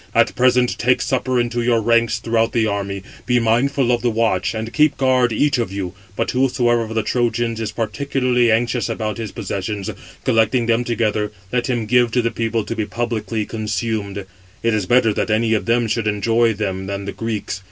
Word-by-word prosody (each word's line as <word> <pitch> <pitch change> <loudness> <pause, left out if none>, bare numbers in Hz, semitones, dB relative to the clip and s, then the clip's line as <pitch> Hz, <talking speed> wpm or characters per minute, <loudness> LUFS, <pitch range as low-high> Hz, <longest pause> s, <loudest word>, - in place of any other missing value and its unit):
At - - +4
present 125 -1 +2
take 125 +1 +3
supper 130 -1 0
in 120 -1 0
your 120 -1 +2
ranks 115 0 +2
throughout 115 0 0
the 115 -2 +2
army; 100 -2 -3 0.2
be 125 0 +3
mindful 125 +3 +2
of 120 -1 +1
the 125 - +1
watch, 115 -3 0
and 110 +1 -4
keep 150 -2 +3
guard 130 -2 +3
each 140 +4 +1
[of 115 -5 -2
you]; 95 -2 -4 0.2
but - - -1
whosoever 125 -2 +2
of 110 0 -5
the 110 - +1
Trojans 115 -1 0
is 110 -2 -3
particularly 125 +2 0
anxious 120 +2 +1
about 110 0 -3
his 110 -3 -4
possessions, 100 0 -4 0.3
collecting 115 +2 +2
them 115 +1 +2
together, 110 -3 -1 0.2
let 125 -1 +1
him 120 -4 -1
give 125 +2 +4
them 115 - -10
to 125 - +3
the 115 - 0
people 115 -1 -1
to 115 +2 -5
be 110 -2 -2
publicly 115 0 -2
consumed; 105 -2 -3 0.4
it 115 -1 +2
is 105 -4 -1
better 120 -2 +4
that 115 - -1
any 110 +1 +2
of 110 - -1
them 120 0 +2
should 110 0 -1
enjoy 115 +3 +2
them 95 -3 -3
than 100 0 -4
the 100 - -3
Greeks. 105 -4 -4
115 Hz, 200 wpm, -20 LUFS, 110-120 Hz, 0.4 s, At